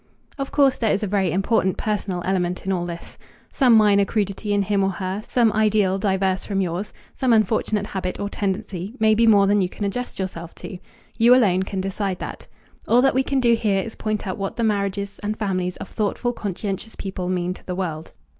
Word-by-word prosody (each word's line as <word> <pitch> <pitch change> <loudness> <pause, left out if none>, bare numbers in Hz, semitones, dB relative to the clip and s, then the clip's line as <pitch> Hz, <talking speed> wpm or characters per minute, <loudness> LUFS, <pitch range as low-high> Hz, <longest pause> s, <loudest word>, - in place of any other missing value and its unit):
Of 275 - -3
course 280 -2 +3
there 225 - +2
is 205 - 0
a - - +2
very 195 -3 +1
important 190 +1 +1
personal 200 -4 -2
element 180 -1 -1
in 195 - 0
all 175 -2 -1
this. 170 -1 -8 0.3
Some 250 -4 +4
minor 205 -2 +5
crudity 205 0 -2
in 205 -1 +2
him 200 0 +1
or 195 - +2
her, 190 +1 -3
some 235 -3 +3
ideal 210 -3 +2
diverse 190 -1 0
from 200 -2 -2
yours, 185 +2 -2 0.2
some 260 -2 +1
unfortunate 215 -1 +1
habit 185 -2 -4
or 205 - -2
tendency, 200 0 -3
may 220 0 +4
be 230 +1 +3
more 205 -3 +6
than 205 +1 +3
you 180 - 0
can 205 - -5
adjust 245 +5 -4
yourself 170 -3 -5
to. 185 - -8 0.4
You 240 +2 +7
alone 195 -7 +3
can 190 0 -3
decide 195 0 -2
that. - - -7 0.4
All 245 +2 +4
that 270 - +4
we 265 - +3
can 270 0 0
do 240 -2 +4
here 205 -4 +1
is 225 - -7
point 215 -1 -3
out 190 +1 -4
what 195 0 -3
the 235 - -1
marriages 200 -2 -1
and 210 +1 -3
families 185 -4 -2
of - - -7
thoughtful, 220 +3 -1
conscientious 200 +1 -4
people 190 -2 -4
mean 180 -1 -1
to - - -16
the 180 - -3
world. 165 -4 -4
200 Hz, 210 wpm, -22 LUFS, 190-220 Hz, 0.4 s, You